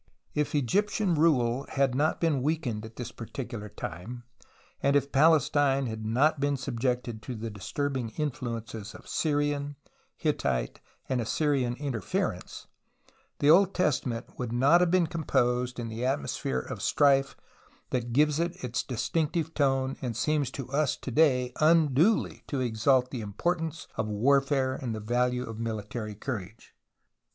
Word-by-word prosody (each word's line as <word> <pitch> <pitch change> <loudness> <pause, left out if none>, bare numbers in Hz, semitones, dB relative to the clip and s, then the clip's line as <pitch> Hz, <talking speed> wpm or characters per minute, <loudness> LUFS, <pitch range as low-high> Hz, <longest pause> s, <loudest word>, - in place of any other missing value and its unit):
If 150 0 -1
Egyptian 195 - +1
rule 135 -6 +2
had 135 -2 +1
not 150 +4 +1
been 155 -6 +1
weakened 130 -7 -1
at 110 0 -11
this 120 - -6
particular 115 -2 -6
time 105 +4 -7 0.6
and 140 0 +2
Palestine 145 -2 +4
had 110 -2 -5
not 140 +7 +3
been 140 0 +1
subjected 125 -2 -2
to 125 +3 -6
the 110 0 -5
disturbing 130 +4 -3
influences 115 -7 -4
of - - -13
Syrian, 145 -1 0 0.4
Hittite, - - -1 0.3
and 130 -2 0
Assyrian 125 +1 0
interference, 130 -7 -3 0.7
the 145 +1 +5
Old 195 +3 +5
Testament 130 -8 -1
would 125 -2 -3
not 140 +9 +5
have 180 - +3
been 180 0 +3
composed 125 -6 0
in 120 - -3
the 115 +2 -5
atmosphere 130 - -1
of - - -7
strife 135 -1 +3 0.5
that 120 -2 -1
gives 150 +4 +3
it 170 0 -2
its 125 0 -1
distinctive 160 +5 -1
tone 135 -2 +1
and 120 -4 -3
seems 150 -2 +1
to 135 -1 -6
us 145 -1 +1
to 130 - -6
day 125 -3 +3
unduly 160 - +3
to 140 - -2
exalt 125 +2 +2
the 125 - -4
importance 160 - -2
of 110 -1 -1
warfare 135 +4 +2
and 125 -4 -4
the - - -4
value 125 +3 0
of 115 -1 -7
military 110 -1 -4
couraiye. 110 -2 -5
130 Hz, 145 wpm, -28 LUFS, 115-150 Hz, 0.7 s, the